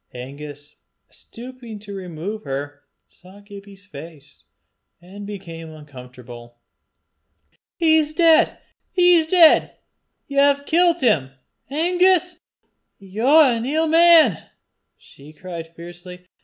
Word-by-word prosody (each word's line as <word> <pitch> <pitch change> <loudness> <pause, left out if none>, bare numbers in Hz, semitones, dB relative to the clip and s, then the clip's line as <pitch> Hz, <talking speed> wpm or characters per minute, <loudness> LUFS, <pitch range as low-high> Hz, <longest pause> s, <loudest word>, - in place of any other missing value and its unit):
Angus, 145 +3 -11 0.3
stooping 240 -2 -12
to 205 -1 -10
remove 190 +3 -7
her, 145 -2 -7 0.3
saw 185 +3 -19
Gibbie's 200 -1 -14
face, 150 -4 -14 0.5
and 195 +4 -12
became 170 -5 -9
uncomfortable. 125 -5 -14 1.2
"He's 315 -2 +1
deid! 330 -1 +3 0.3
he's 355 -3 +3
deid! 335 -2 +4 0.5
Ye've 280 0 +1
killt 345 +1 +1
him, 165 - +1 0.4
Angus! 360 +3 +1 0.6
Ye're 250 +10 +2
an 230 - -4
ill 310 +6 -1
man!" 330 0 +4 0.5
she 145 +3 -18
cried 170 0 -9
fiercely. 175 +1 -12
200 Hz, 95 wpm, -20 LUFS, -, 1.2 s, deid